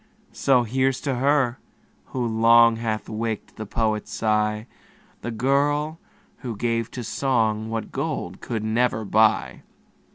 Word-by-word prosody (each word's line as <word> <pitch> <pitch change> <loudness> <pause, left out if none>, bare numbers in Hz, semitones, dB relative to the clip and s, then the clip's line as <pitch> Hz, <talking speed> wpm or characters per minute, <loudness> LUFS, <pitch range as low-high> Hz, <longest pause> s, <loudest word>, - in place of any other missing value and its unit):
So 130 -3 +3
here's 130 +3 0
to 140 - -1
her, 130 -1 +1 0.5
who 125 -2 -3
long 115 0 +5
Hath 110 -2 -3
waked 110 0 -4
the 110 - -6
poet's 110 -1 -1
sigh, 105 0 0 0.6
The - - -4
girl, 145 +6 0 0.4
who 120 -4 -6
gave 115 +1 -1
to 125 - -3
song 110 -3 0
What 115 0 -4
gold - - -4
could 110 -3 -3
never 110 0 0
buy. 110 +2 +2
115 Hz, 130 wpm, -24 LUFS, 110-130 Hz, 0.6 s, long